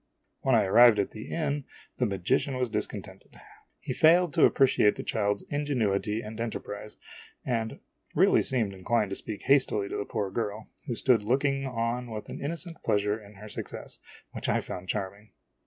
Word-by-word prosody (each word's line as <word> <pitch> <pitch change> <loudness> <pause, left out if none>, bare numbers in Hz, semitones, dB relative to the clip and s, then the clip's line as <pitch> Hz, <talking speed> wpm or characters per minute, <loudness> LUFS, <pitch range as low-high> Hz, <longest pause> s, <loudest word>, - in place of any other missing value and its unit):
When 130 -2 +2
I 115 - +5
arrived 115 +3 +7
at 100 - 0
the 110 - -9
inn, 145 -3 -1 0.3
the 125 - +1
magician 100 +7 0
was 125 -3 -1
discontented. - - -5 0.4
He - - -4
failed 170 0 +5
to - - +6
appreciate 130 -6 +4
the - - -6
child's 105 -2 0
ingenuity 110 -8 0
and 110 +1 -7
enterprise, 105 -2 -5 0.5
and 115 -3 -2 0.4
really - - +5
seemed 115 -7 0
inclined 100 +2 0
to - - -2
speak 105 0 -6
hastily 125 -7 +3
to - - -3
the 100 - -3
poor 105 -4 -3
girl, 110 0 -3 0.2
who 120 - -2
stood 120 -2 +3
look 130 +7 +1
ing 135 -1 0
on 120 0 -2
with 110 -1 -6
an - - -7
innocent 165 +3 -5
pleasure 105 +1 +1
in 105 +1 -15
her 105 +3 -10
success, - - -7 0.3
which - - -4
I - - +3
found 90 0 -7
charming. 100 0 -4
110 Hz, 175 wpm, -28 LUFS, 105-130 Hz, 0.5 s, arrived